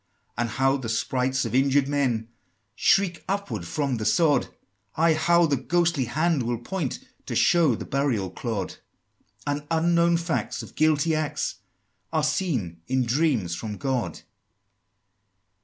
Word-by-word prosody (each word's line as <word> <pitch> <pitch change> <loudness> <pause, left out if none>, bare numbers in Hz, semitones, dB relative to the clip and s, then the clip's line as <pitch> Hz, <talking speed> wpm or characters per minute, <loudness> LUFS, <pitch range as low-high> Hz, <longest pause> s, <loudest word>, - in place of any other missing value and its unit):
And 120 0 -1
how 135 +4 +2
the 125 -4 -5
sprites 130 +3 0
of - - -4
injured 135 +1 +3
men 125 -6 0 0.4
Shriek 185 -2 +2
upward 200 +1 -3
from 140 -5 -1
the 110 - -4
sod, 155 +5 +3 0.5
Ay, 165 +1 +4
how 170 +2 +4
the 145 -3 +1
ghostly 170 0 +1
hand 155 +4 +1
will 120 0 -1
point 150 +4 -3 0.3
To - - -3
show 165 -8 +4
the - - -7
burial 130 -9 -1
clod; 110 -6 -4 0.7
And 145 0 -2
unknown 170 +1 +3
facts 170 -1 -2
of - - -12
guilty 155 +1 +2
acts 155 -7 -2 0.5
Are 155 - +1
seen 145 - -1
in 130 0 +1
dreams 120 - +1
from 105 +3 -5
God! 130 -4 -2
140 Hz, 140 wpm, -25 LUFS, 120-165 Hz, 0.7 s, Ay